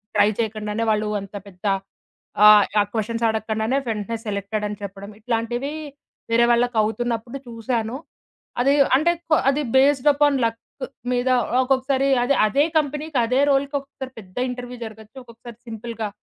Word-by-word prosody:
Try -, -, +5 dB
చేయకుండానే 215 Hz, 0 st, -2 dB
వాళ్ళు 215 Hz, 0 st, +1 dB
అంత 195 Hz, +1 st, -10 dB
పెద్ద 180 Hz, 0 st, -14 dB, 1.1 s
ఆ -, -, +6 dB
క్వెషన్స్ 230 Hz, +1 st, -2 dB
అడగకుండానే 220 Hz, +3 st, -1 dB
వెంటనే 220 Hz, +1 st, -3 dB
సెలెక్టెడ్ 210 Hz, +1 st, -3 dB
అని 205 Hz, 0 st, -6 dB
చెప్పడం. 200 Hz, 0 st, -8 dB
ఇట్లాంటివి 240 Hz, +4 st, -2 dB, 0.6 s
వేరే 235 Hz, +1 st, +5 dB
వాళ్ళకి 240 Hz, 0 st, +2 dB
అవుతున్నప్పుడు 235 Hz, +3 st, -2 dB
చూసాను. 230 Hz, 0 st, -3 dB, 0.7 s
అది 275 Hz, +3 st, +4 dB, 0.2 s
అంటే 310 Hz, +6 st, +3 dB, 0.2 s
కొ 310 Hz, -, +5 dB
అది 280 Hz, +2 st, +1 dB
బేస్డ్ 275 Hz, +1 st, +4 dB
అపాన్ 285 Hz, -1 st, +3 dB
లక్ 230 Hz, 0 st, -2 dB, 0.5 s
మీద 245 Hz, +1 st, 0 dB, 0.3 s
ఒక్కొక్కసారి, 265 Hz, +1 st, +1 dB, 0.2 s
అదే 280 Hz, +3 st, +2 dB
అదే 275 Hz, +7 st, +2 dB
కంపెనీకి, 300 Hz, 0 st, -1 dB
అదే 250 Hz, +3 st, +1 dB
రోల్‌కి 280 Hz, +1 st, +1 dB
ఒకసారి 270 Hz, -1 st, -9 dB
పెద్ద 185 Hz, -3 st, -15 dB
ఇంటర్వ్యూ 250 Hz, 0 st, -7 dB
జరగొచ్చు, 220 Hz, +2 st, -12 dB
ఒక్కొక్కసారి 235 Hz, -1 st, -13 dB
సింపుల్‌గా 225 Hz, -1 st, -5 dB
235 Hz, 135 wpm, -22 LUFS, 220-265 Hz, 1.1 s, ఆ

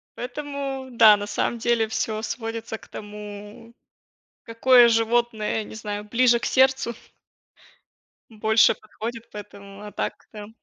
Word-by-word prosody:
Поэтому, 270 Hz, +1 st, -5 dB
да, 220 Hz, -3 st, +7 dB
на 205 Hz, 0 st, -5 dB
самом 235 Hz, -, -1 dB
деле 230 Hz, -1 st, +1 dB
всё 215 Hz, 0 st, -2 dB
сводится 225 Hz, 0 st, -5 dB
к -, -, -18 dB
тому, 210 Hz, +2 st, -10 dB, 0.7 s
какое 240 Hz, +1 st, +5 dB
животное, 225 Hz, -1 st, 0 dB
не -, -, -11 dB
знаю, 210 Hz, -1 st, -5 dB
ближе 235 Hz, +2 st, +3 dB
к -, -, -7 dB
сердцу. 265 Hz, -2 st, +2 dB, 1.4 s
Больше 220 Hz, 0 st, +3 dB
подходит, 230 Hz, +2 st, -8 dB
поэтому, 200 Hz, -1 st, -11 dB
а 210 Hz, -, -8 dB
так, -, -, -3 dB, 0.2 s
та. 210 Hz, -1 st, -9 dB
225 Hz, 125 wpm, -24 LUFS, 210-240 Hz, 1.4 s, да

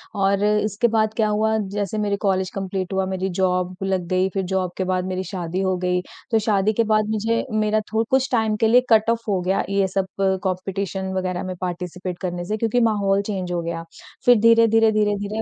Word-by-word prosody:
और 195 Hz, 0 st, +1 dB
इसके 210 Hz, +2 st, +1 dB
बाद 220 Hz, -1 st, +1 dB
क्या 220 Hz, -2 st, +3 dB
हुआ 220 Hz, +1 st, +1 dB
जैसे 205 Hz, 0 st, -3 dB
मेरे 205 Hz, -1 st, 0 dB
कॉलेज 190 Hz, -2 st, +1 dB
कंप्लीट 190 Hz, -1 st, -3 dB
हुआ, 190 Hz, 0 st, +1 dB
मेरी 190 Hz, 0 st, -2 dB
जॉब 185 Hz, 0 st, 0 dB
लग 190 Hz, -2 st, -1 dB
गई, 185 Hz, +1 st, +1 dB
फिर 195 Hz, 0 st, -2 dB
जॉब 185 Hz, -1 st, -1 dB
के 190 Hz, -, 0 dB
बाद 185 Hz, 0 st, -1 dB
मेरी 185 Hz, 0 st, -3 dB
शादी 180 Hz, -1 st, -4 dB
हो 190 Hz, -1 st, +1 dB
गई। 180 Hz, 0 st, 0 dB, 0.3 s
तो 225 Hz, -, +4 dB
शादी 210 Hz, -1 st, +1 dB
के 230 Hz, -, +2 dB
बाद 215 Hz, -1 st, +1 dB
मुझे 220 Hz, +1 st, 0 dB
मेरा 215 Hz, 0 st, +1 dB
थो 220 Hz, +1 st, +2 dB
कुछ 265 Hz, 0 st, +2 dB
टाइम 220 Hz, -3 st, +1 dB
के -, -, +6 dB
लिए 245 Hz, +3 st, +6 dB
कट 220 Hz, -1 st, +4 dB
ऑफ 230 Hz, 0 st, +1 dB
हो 195 Hz, -3 st, +1 dB
गया 185 Hz, +2 st, 0 dB
ये 195 Hz, -1 st, +2 dB
सब 190 Hz, 0 st, -1 dB, 0.4 s
कॉम्पिटिशन 190 Hz, 0 st, -3 dB
वग़ैरह 185 Hz, -1 st, -2 dB
में 185 Hz, -1 st, -5 dB
पार्टिसिपेट 180 Hz, 0 st, -4 dB
करने 175 Hz, -2 st, -4 dB
से 215 Hz, +4 st, -2 dB
क्योंकि 230 Hz, +2 st, +1 dB
माहौल 200 Hz, -2 st, +1 dB
चेंज 195 Hz, -3 st, -4 dB
हो 175 Hz, -1 st, -1 dB
गया। 165 Hz, 0 st, -5 dB, 0.4 s
फिर 245 Hz, -1 st, +7 dB
धीरे-धीरे, 225 Hz, 0 st, +5 dB
धीरे-धीरे 210 Hz, 0 st, 0 dB
195 Hz, 205 wpm, -22 LUFS, 185-215 Hz, 0.4 s, फिर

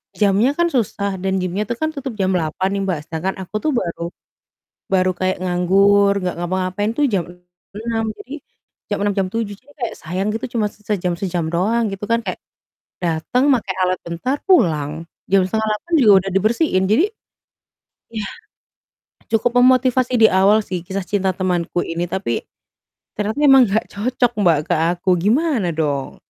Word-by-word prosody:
jamnya 210 Hz, +7 st, +2 dB
kan 345 Hz, 0 st, +1 dB
susah 200 Hz, -5 st, -1 dB
dan 190 Hz, 0 st, -1 dB
gymnya 195 Hz, +3 st, -2 dB
tuh 240 Hz, -, -2 dB
kan 315 Hz, +6 st, -2 dB
tutup 275 Hz, -5 st, -6 dB
jam 190 Hz, -2 st, 0 dB
8.00 180 Hz, +2 st, -1 dB
nih, 200 Hz, 0 st, -1 dB
Mbak, 175 Hz, -5 st, -1 dB
sedangkan 170 Hz, +4 st, -2 dB
aku 185 Hz, -, -12 dB
tuh 310 Hz, -, 0 dB
baru 170 Hz, -6 st, -2 dB, 0.8 s
baru 185 Hz, -1 st, +2 dB
kayak 185 Hz, 0 st, 0 dB
nganggur, 195 Hz, +3 st, +3 dB
nggak 180 Hz, -, -2 dB
ngapa-ngapain 185 Hz, +4 st, -1 dB
tuh 295 Hz, -, +1 dB
jam 185 Hz, -5 st, 0 dB, 0.5 s
6, 225 Hz, +1 st, -2 dB, 0.2 s
jadi, 265 Hz, -, -10 dB, 0.5 s
jam 205 Hz, -, -2 dB
6.00 205 Hz, -, +2 dB
jam 190 Hz, -1 st, +1 dB
7.00, 225 Hz, +1 st, -3 dB
jadi 285 Hz, +3 st, -22 dB
kayak 245 Hz, -6 st, -4 dB
sayang 185 Hz, +5 st, -3 dB
gitu 225 Hz, +4 st, -3 dB
cuma 215 Hz, -2 st, +2 dB
se -, -, -25 dB
sejam-sejam 180 Hz, -3 st, -1 dB
doang 215 Hz, +5 st, +1 dB
gitu 195 Hz, +1 st, -5 dB
kan, 230 Hz, 0 st, +1 dB
kayak -, -, -4 dB, 0.6 s
datang, 175 Hz, -, +1 dB
make 250 Hz, -6 st, +2 dB, 0.2 s
alat 185 Hz, 0 st, +1 dB
bentar, 205 Hz, +12 st, -2 dB
pulang. 160 Hz, -, +2 dB, 0.2 s
Jam 195 Hz, -1 st, +5 dB
07:30 220 Hz, -, -2 dB
juga 225 Hz, -7 st, +6 dB
udah 195 Hz, -, -4 dB
dibersihin, 215 Hz, -, +1 dB
jadi, 215 Hz, -, +3 dB, 1.1 s
yah, 210 Hz, -2 st, -4 dB, 1.0 s
cukup 235 Hz, +2 st, +2 dB
memotivasi 255 Hz, 0 st, +3 dB
di 225 Hz, -, +8 dB
awal 195 Hz, +2 st, +4 dB
sih 180 Hz, -2 st, -3 dB
kisah 190 Hz, +2 st, -4 dB
cinta 195 Hz, -2 st, 0 dB
temanku 175 Hz, -2 st, -1 dB
ini, 170 Hz, +1 st, -3 dB
tapi, 190 Hz, -12 st, -2 dB, 0.8 s
ternyata 210 Hz, +1 st, -1 dB
emang 270 Hz, -2 st, +8 dB
nggak 215 Hz, +3 st, 0 dB
cocok, 240 Hz, +3 st, 0 dB
Mbak, 170 Hz, -6 st, +4 dB
ke -, -, +4 dB, 0.2 s
aku 180 Hz, +2 st, -2 dB
gimana 235 Hz, -, +1 dB
dong? 145 Hz, -4 st, -2 dB
200 Hz, 160 wpm, -20 LUFS, 180-230 Hz, 1.1 s, di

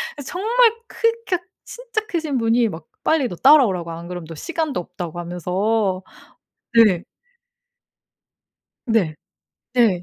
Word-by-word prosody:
그래서 285 Hz, -3 st, -9 dB
정말 455 Hz, +5 st, +4 dB, 0.2 s
크 460 Hz, 0 st, +1 dB
키가 360 Hz, -2 st, 0 dB, 0.2 s
진짜 475 Hz, -2 st, -4 dB
크신 320 Hz, -, -1 dB
분이 230 Hz, 0 st, +2 dB
막 160 Hz, -3 st, -8 dB, 0.2 s
빨리 315 Hz, -5 st, +2 dB
너 180 Hz, -, -6 dB
따라오라고 190 Hz, -, +5 dB
안 165 Hz, +1 st, -7 dB
그러면 175 Hz, -2 st, -7 dB
너 165 Hz, -, -8 dB
시간도 320 Hz, -, -2 dB
없다고 175 Hz, -1 st, -6 dB
하면서 185 Hz, +3 st, -1 dB, 0.7 s
네. 205 Hz, -7 st, +5 dB, 1.8 s
네. 210 Hz, -10 st, +1 dB, 0.6 s
네. 215 Hz, -8 st, +3 dB
225 Hz, 240 characters per minute, -21 LUFS, -, 1.8 s, 따라오라고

